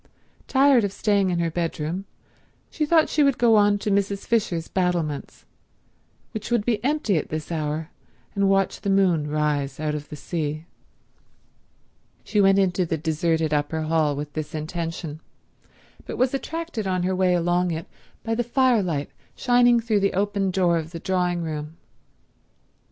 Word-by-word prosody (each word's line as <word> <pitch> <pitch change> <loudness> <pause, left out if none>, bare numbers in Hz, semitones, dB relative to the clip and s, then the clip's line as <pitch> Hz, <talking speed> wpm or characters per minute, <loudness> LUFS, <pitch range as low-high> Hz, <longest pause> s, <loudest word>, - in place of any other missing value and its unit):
Tired 270 -3 +4
of 200 - -1
staying 200 -2 +1
in 175 - 0
her 170 -1 0
bedroom 165 +2 -3 0.7
she 305 -2 -1
thought 320 0 +4
she 305 - +1
would 275 -3 +3
go 235 -2 +4
on 205 -1 +4
to 205 +1 -2
Mrs. 200 0 0
Fisher's 190 -8 0
battlements, 175 -6 -2 0.9
which 220 -2 -6
would 235 -4 +1
be 225 -3 0
empty 270 - +1
at 150 - -3
this 155 +1 -5
hour, 155 0 -3 0.4
and 200 -1 +2
watch 195 -1 +1
the 200 - -2
moon 180 -6 +2
rise 145 -2 -1
out 155 -1 -1
of 150 -1 -6
the - - -7
sea. 155 0 -4 1.6
She 210 - +1
went 195 0 +5
into 185 -1 +2
the 165 -1 -2
deserted 160 0 0
upper 150 +2 -1
hall 155 -2 +1
with 145 +1 -6
this 155 0 -5
intention, 165 0 -4 0.9
but - - -5
was 255 +1 +2
attracted 315 - -4
on 185 -1 0
her 185 +1 0
way 185 -1 +3
along 175 +1 +1
it 165 -1 -3 0.4
by 225 - -1
the 240 +2 0
firelight 225 - +1 0.2
shining 245 -1 +4
through 225 -2 +1
the 200 0 +1
open 200 0 0
door 180 -2 +2
of 160 0 -6
the 165 0 -7
drawing 180 -1 0
room. 155 0 -5
180 Hz, 160 wpm, -24 LUFS, 160-205 Hz, 1.6 s, went